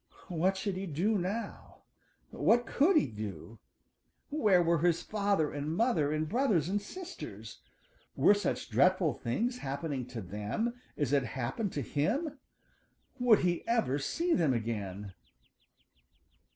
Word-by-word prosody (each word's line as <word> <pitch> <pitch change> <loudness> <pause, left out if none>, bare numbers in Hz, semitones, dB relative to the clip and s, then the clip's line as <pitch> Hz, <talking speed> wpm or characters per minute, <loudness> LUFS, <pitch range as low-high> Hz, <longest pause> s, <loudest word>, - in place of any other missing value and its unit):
What 185 +3 +1
should 190 -1 -2
he 195 +1 -4
do 190 +7 +1
now? 200 +6 -5 0.5
What 240 +1 +3
could 310 +11 +3
he - - +4
do? 105 - -7 0.7
Where 210 - +4
were 170 -1 +2
his 170 +1 +2
father 200 -7 0
and 145 +2 -3
mother 175 - +2
and 155 +1 -1
brothers 205 - +1
and 205 +1 0
sisters? 365 - -9 0.5
Were - - +6
such 205 0 -2
dreadful 185 -5 +3
things 235 - -2
happening 140 - -3
to 125 -2 -6
them 105 - -2 0.2
as 145 -3 0
had 140 -2 +3
happened 130 - -2
to 145 - -2
him? 270 - -1 0.8
Would 240 -4 +5
he 175 -2 0
ever 225 - +1
see 335 - 0
them 150 -7 +2
again? 105 -4 -4
175 Hz, 135 wpm, -31 LUFS, 140-220 Hz, 0.8 s, Were